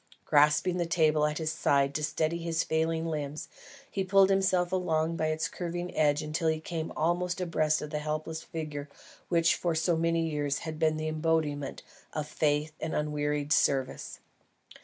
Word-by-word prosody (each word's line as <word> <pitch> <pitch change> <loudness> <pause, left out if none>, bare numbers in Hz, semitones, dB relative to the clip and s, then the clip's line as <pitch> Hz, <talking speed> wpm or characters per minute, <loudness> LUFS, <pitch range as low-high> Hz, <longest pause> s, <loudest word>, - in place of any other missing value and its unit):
Grasping 150 +5 +4
the 175 -1 0
table 155 -3 +3
at 150 0 -3
his 155 -1 -1
side 140 -3 +2
to 150 - -2
steady 155 +2 0
his 165 -1 0
failing 160 +1 0
limbs, 155 0 -4 0.4
he 195 - -1
pulled 195 +1 +5
himself 185 -2 +2
along 165 -3 0
by 155 - 0
its 155 0 0
curving 175 0 -5
edge 150 0 +2
till 165 0 0
he 160 0 +1
came 160 0 -4
almost 175 +3 0
abreast 155 -4 +1
of 150 - -7
the 150 - -1
helpless 155 +1 -3
figure 150 -3 -6 0.4
which 165 -1 +4
for 170 -2 -1
so 165 +2 +2
many 165 0 +1
years 145 -2 -1
had 155 -1 -5
been 155 -1 +2
the 155 0 -3
embodiment 155 -3 -1 0.3
of 150 -1 -3
faithful 150 0 0
and 160 - -2
unwearied 150 -1 0
service. 135 -2 0
160 Hz, 170 wpm, -29 LUFS, 150-165 Hz, 0.4 s, pulled